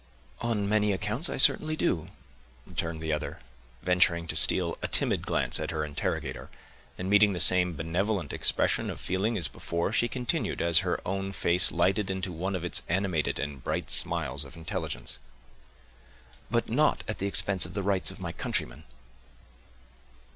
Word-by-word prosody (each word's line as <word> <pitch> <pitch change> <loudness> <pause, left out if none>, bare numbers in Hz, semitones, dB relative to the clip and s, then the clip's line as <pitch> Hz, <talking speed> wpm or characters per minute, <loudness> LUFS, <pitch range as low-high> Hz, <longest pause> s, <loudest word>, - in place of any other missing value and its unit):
"On 110 -4 -1
many 105 0 +2
accounts 105 - -1
I - - -3
certainly 155 0 +5
do," 85 - 0 0.6
returned 80 -1 -4
the 80 -1 -1
other, 75 - -4 0.5
venturing 90 -2 +2
to - - -3
steal 85 +2 +5
a - - -2
timid - - 0
glance - - +1
at - - -3
her 75 -1 -2
interrogator; 75 -1 -4 0.5
and, 90 - -4
meeting 105 0 +5
the 90 - -3
same 90 -1 +5
benevolent 85 +1 -2
expression - - +1
of - - -6
feeling 100 +5 -1
as 85 -6 0
before, 85 +4 -3
she 120 - +3
continued, 125 0 -2
as 85 0 +5
her 90 -2 -1
own 95 +1 -3
face 90 -1 +3
lighted 95 +4 +1
into 95 -1 -3
one 95 +4 -3
of 90 - -4
its 90 - 0
animated 90 -3 0
and 70 -3 -5
bright - - -3
smiles 75 -5 0
of 70 - -12
intelligence, 80 -6 -5 1.3
"but - - 0
not - - +2
at - - -4
the 100 - -1
expense 95 -3 +1
of 85 - -12
the 100 - -2
rights 95 -1 +2
of - - -2
my - - -4
countrymen." 70 +6 -4
90 Hz, 165 wpm, -28 LUFS, 80-100 Hz, 1.3 s, certainly